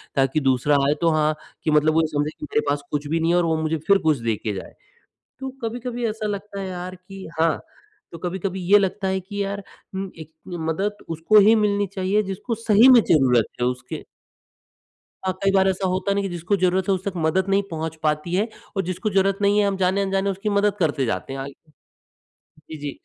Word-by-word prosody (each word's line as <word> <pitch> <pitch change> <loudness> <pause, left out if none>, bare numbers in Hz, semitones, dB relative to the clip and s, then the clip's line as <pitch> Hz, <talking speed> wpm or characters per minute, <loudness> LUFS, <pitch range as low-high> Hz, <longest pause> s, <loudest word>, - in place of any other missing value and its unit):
ताकि 135 +2 +2
दूसरा 135 +1 +2
आए 145 - +4
तो 165 - +4
हाँ, 155 0 +2 0.3
कि 155 - +1
मतलब 150 +1 +4
वो 160 0 +3
समझ 150 0 -1
मेरे 150 0 0
पास 145 0 0
कुछ 145 0 -2
भी 165 +3 0
नहीं 165 +1 +1
है 175 - +3
और 175 - +2
वो 160 -1 +1
मुझे 160 +1 0
फिर 200 - +6
कुछ 155 -3 +4
देके 110 -2 -2
जाए। 95 - -8 0.7
तो 265 - -4
कभी-कभी 240 +1 -3
ऐसा 215 0 -3
लगता 200 0 -5
है 190 - -4
यार 180 0 -6
कि 190 +1 -11
हाँ, 165 -2 +2 0.5
तो 165 - -8
कभी-कभी 185 +2 -3
ये 205 - +10
लगता 195 0 -1
है 190 0 0
कि 205 +2 -4
यार 200 0 -4 0.3
उम, 190 0 -4
एक 160 0 -10 0.2
मदद 175 +5 -3
उसको 165 +6 +3
ही 215 +3 +6
मिलनी 205 -2 +2
चाहिए 195 +2 +1
जिसको 195 +4 -4
सही 225 +2 +5
में 255 -2 +9
जरूरत 130 - +3
है 120 - +2
उसके 125 0 -4 1.2
हाँ, 185 - +1
कई 195 - +4
बार 190 0 +4
ऐसा 190 0 -1
होता 185 +2 0
नहीं 200 0 0
कि 195 - -2
जिसको 175 +3 -1
जरूरत 185 +1 +1
है 195 - +5
उससे 190 +2 -2
मदद 180 +4 +1
नहीं 195 +1 +3
पहुँच 160 0 -4
पाती 155 +2 0
है 205 +4 +1 0.3
और 195 - +1
जिसको 185 +4 -2
जरूरत 195 0 +2
नहीं 205 +1 +3
है 205 - +3
हम 195 -1 -1
जाने-अनजाने 195 +1 +1
उसकी 195 +2 -2
मदद 205 0 +2
करते 145 -5 +1
जाते 125 +3 -3
हैं। 135 - -5
अ 135 - -4 1.2
जी, 155 - -6
जी। 145 -1 -4
185 Hz, 210 wpm, -23 LUFS, 155-200 Hz, 1.2 s, ये